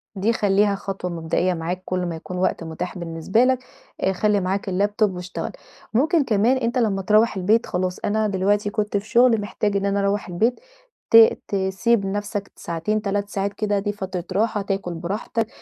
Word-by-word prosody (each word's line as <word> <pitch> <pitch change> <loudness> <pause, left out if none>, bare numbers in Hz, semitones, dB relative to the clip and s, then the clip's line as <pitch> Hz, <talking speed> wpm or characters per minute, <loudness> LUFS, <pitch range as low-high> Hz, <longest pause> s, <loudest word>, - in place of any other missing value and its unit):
دي 205 +4 +1
خلّيها 205 -1 +2
خطوة 195 -2 -5
مبدئية 170 +2 0
معاك 175 +2 -3
كل 180 -1 -1
ما 170 - -3
يكون 180 +3 -7
وقت 185 -2 0
متاح 170 +3 -5
بالنسبة 170 +7 0
لك، 255 0 +2 0.4
آآ 190 - +2
خلّي 210 +2 +2
معاك 195 +1 -2
الLaptop 205 +3 +1
واشتغل. 180 0 -5 0.4
ممكن 310 +6 +3
كمان 235 +2 +2
أنت 235 0 -1
لمّا 210 -5 +1
تروّح 215 +2 +3
البيت 210 +5 +2
خلاص 180 0 -2
أنا 215 +1 0
دلوقتي 205 +1 +1
كنت 210 0 -1
في 205 +2 -6
شغل 240 -3 +4
محتاج 205 0 -1
إن 200 - -1
أنا 200 0 +1
أروّح 200 +1 0
البيت، 225 +8 +1 0.5
ت 225 0 +7
تسيب 195 +2 +1
نفْسك 205 0 -3
ساعتين 170 +6 -2
3 200 0 -2
ساعات 200 0 -2
كده، 205 -2 0
دي 205 +1 -1
فترة 190 -3 -5
راحة، 215 0 +1
تاكل 195 -3 -3
براحتك، 210 +6 -3
200 Hz, 175 wpm, -22 LUFS, 185-215 Hz, 0.5 s, ت